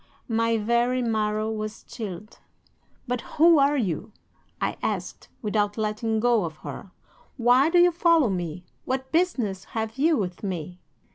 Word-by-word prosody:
"'My 230 -1 +1
very 235 +3 +1
marrow 215 -1 0
was 215 0 -5
chilled. 210 -2 -8 0.7
"'"But 245 -1 -1 0.2
who 330 0 +7
are 280 +1 +3
you?" 200 - -2 0.5
I - - -1
asked, - - -4
without 205 0 0
letting 220 +1 -1
go 235 -2 +3
of 160 -2 -5
her. 195 - -7 0.5
"Why 250 +4 +4
do 350 - +3
you 350 0 +6
follow 335 - +3
me? 175 -1 -4 0.2
What 260 0 -3
business 250 - 0
have 225 +3 -3
you 315 +2 +4
with 180 -5 -3
me?" 180 -3 -5
225 Hz, 145 wpm, -25 LUFS, 210-260 Hz, 0.7 s, who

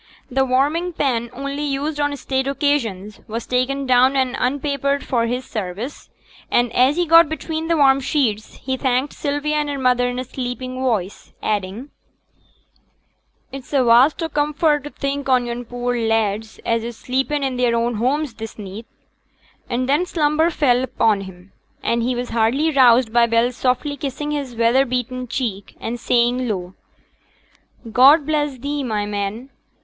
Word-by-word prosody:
The 265 +1 +2
warming 295 +8 +1
pan, 240 -6 -1
only 280 +3 -5
used 290 +1 -2
on 290 -1 0
state 265 0 -2
occasions, 235 -9 -1
was 225 +1 -5
taken 265 +2 0
down 255 +1 +4
and 260 -1 +1
unpapered 280 +1 -1
for 235 -2 0
his 250 +2 -3
service; 215 +5 -6 0.4
and 240 -1 +1
as 260 +4 +4
he 350 +1 +1
got 330 -1 +6
between 315 0 -4
the 335 -1 +2
warm 275 -2 +5
sheets, 250 -6 -1
he 260 0 -4
thanked 260 +1 0
Sylvia 295 +1 -1
and 295 -1 -1
her 285 - -3
mother 250 -1 +2
in 245 - -4
a 255 - -2
sleepy 255 0 -5
voice, 240 -7 -3
adding, 210 +6 -3 1.6
'It's 270 -1 -9
a 270 -2 +4
vast 250 +8 +4
o' 325 - -2
comfort 295 0 +1
to - - -5
think 280 -1 -4
on 250 -1 +3
yon 240 +1 -5
poor 245 +1 -3
lads 225 -2 -1
as 230 -1 0
is 235 -1 -6
sleepin' 270 +3 -1
i' 265 -2 -1
their 245 -1 +1
own 235 +1 0
homes 270 +4 0
this 225 0 -8
neet,' 210 +2 -8 0.8
and 255 +1 -1
then 300 +7 +2
slumber 315 0 +2
fell 255 -7 +2
upon 225 -5 +1
him, 190 0 -12 0.3
and 235 0 +1
he 245 +2 0
was 245 0 -4
hardly 235 +8 +1
roused 250 -4 +5
by 235 -1 +5
Bell's 230 +2 +1
softly 255 +4 0
kissing 285 +2 -4
his 280 -5 -4
weather 235 +3 +3
beaten 250 0 -3
cheek, 220 -6 -4
and 240 +2 -4
saying 245 +2 +1
low, 185 -3 -4 1.2
'God 275 +6 +6
bless 295 -3 -1
thee, 285 +3 -3
my 215 -4 -1
man! 205 +5 -4
255 Hz, 165 wpm, -20 LUFS, 235-285 Hz, 1.6 s, got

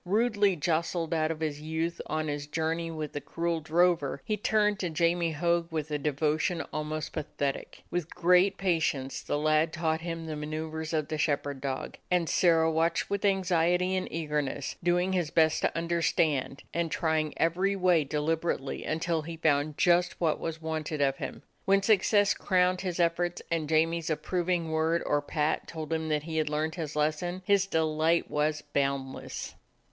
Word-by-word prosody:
Rudely 205 0 +2
jostled 165 +1 -1
out 155 -1 +1
of 160 -1 -4
his 150 -2 -2
youth 160 +2 -2
on 155 +1 -1
his 145 0 -3
journey 165 +2 -1
with 155 -2 -5
the 145 - -4
cruel 170 +1 -2
drover, 165 -3 +2
he 215 - 0
turned 210 -1 +1
to 180 - -1
Jamie 170 +1 +1
Hogg 170 +2 0
with 155 -1 -3
a 150 - 0
devotion 155 +4 0
almost 155 0 -3
pathetic. 145 -3 -4
With 175 -2 -3
great 180 +3 +4
patience 155 -8 0
the - - -2
lad 155 +1 +2
taught 160 -1 -1
him 165 -1 -4
the 155 -1 -4
manceuvers 155 +1 -4
of 155 -2 -1
the 155 -2 -3
shepherd 145 -2 -1
dog, 135 -1 -4
and 180 -2 +2
Sirrah 165 -2 +3
watched 165 +3 0
with 200 0 -1
anxiety 180 -2 +2
and 185 - -2
eagerness, 150 -4 -2
doing 175 +2 +1
his 175 -5 0
best 160 -1 +3
to - - 0
understand, 165 -5 0
and 170 -1 0
trying 155 -2 0
every 185 +5 +1
way 180 -4 +3
deliberately 150 0 -2
until 165 +1 -1
he 165 +2 -7
found 150 -2 +1
just 175 0 +3
what 160 -3 +1
was 165 -1 -4
wanted 160 -1 -3
of 135 -1 +2
him. - - -6 0.2
When 195 0 +3
success 205 -1 +4
crowned 180 -1 +1
his 180 -2 -3
efforts 175 +1 0
and 160 -3 -1
Jamie's 165 +1 +2
approving 170 +1 -1
word 160 +1 +1
or 145 0 +1
pat 150 +1 -1
told 160 -1 -5
him 160 0 -2
that 150 -1 0
he 160 0 -4
had 155 -1 +1
learned 155 +1 -1
his 160 -4 -5
lesson, 155 +5 -1
his 200 -1 +3
delight 160 0 +1
was 150 0 0
boundless. 135 -1 -3
160 Hz, 170 wpm, -29 LUFS, 155-175 Hz, 0.2 s, great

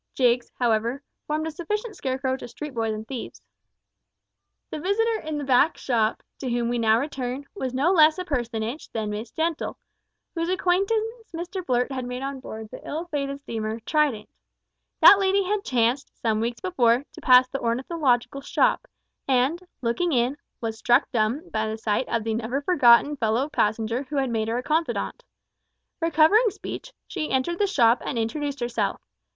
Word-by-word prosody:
Jiggs, 245 -1 +2
however, 235 +3 0 0.2
formed 305 +1 -1
a 320 - -3
sufficient 420 +7 -4
scarecrow 260 0 -1
to - - -8
street 300 +4 -7
boys 225 -2 -1
and 215 0 -5
thieves. 260 -3 -7 1.3
The - - -4
visitor 440 +6 +1
in 310 -1 -4
the 290 - -3
back 270 +4 +3
shop 225 -4 0 0.2
to 260 - -3
whom 240 -1 0
we 240 0 0
now 220 -1 +4
return 270 -1 -4
was 265 -11 -3
no 270 +8 +2
less 315 -3 +6
a 365 - -4
personage 240 -2 -3
than 215 -2 -2
Miss 215 +3 -5
Gentle, 325 -1 -2 0.6
whose 335 0 -2
acquaintance 430 +5 0
Mr 360 +3 -5
Blurt 250 -2 0
had 260 -2 -3
made 250 +1 -5
on 275 0 -4
board 220 -4 -8
the - - -9
ill 320 +3 -4
fated 285 -2 -1
mail 275 - -4
steamer 225 -4 -4
Trident. 275 -5 0 0.7
That 400 - +9
lady 390 0 +2
had 405 +2 -1
chanced, 245 - +1
some 220 -2 0
weeks 235 +1 -3
before, 255 -8 +2
to - - -11
pass 255 0 +7
the 275 - -3
ornithological 250 +1 0
shop, - - +1 0.4
and, 270 +6 +2 0.2
looking 295 +9 0
in, 245 +2 +2 0.3
was 225 -1 -4
struck 245 +3 +3
dumb 240 +8 0
by 220 0 -1
the 220 0 -3
sight 220 +2 -1
of 230 - 0
the 225 0 -1
never 240 +5 -2
forgotten 285 -3 +5
fellow 230 +4 0
passenger 225 -1 0
who 285 +2 -7
had 265 -3 0
made 220 -1 -1
her 230 +2 -1
a 250 - -3
confidant. 320 - -1 0.8
Recovering 330 +8 +5
speech, - - -8
she 315 -5 -4
entered 270 +7 0
the 410 - +3
shop 240 -10 +3
and 255 - -3
introduced 280 +4 -2
herself. 240 0 -1
265 Hz, 175 wpm, -25 LUFS, 235-320 Hz, 1.3 s, That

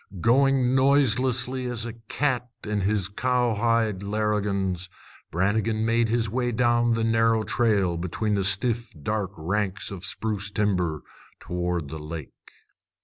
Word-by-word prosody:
Going 130 +3 +3
noiselessly 130 -1 +2
as 120 -2 -2
a 120 - -5
cat 125 +2 -2
in 105 -1 -1
his 100 -1 0
cowhide 115 -2 +1
larrigans, 100 -3 -1 0.4
Brannigan 110 +5 0
made 115 0 +2
his 115 0 +1
way 120 +3 -1
down 120 0 +2
the 115 - -1
narrow 115 0 +2
trail 100 -8 +1
between 90 +5 -2
the 100 -1 +1
stiff 115 +5 +1
dark 100 +5 -2
ranks 95 +5 -2
of 100 - -6
the 95 - -5
spruce 105 -3 -2
timber 90 -8 0 0.4
toward 90 -3 -3
the 80 - -6
lake. 75 -1 -7
110 Hz, 135 wpm, -25 LUFS, 95-120 Hz, 0.4 s, Going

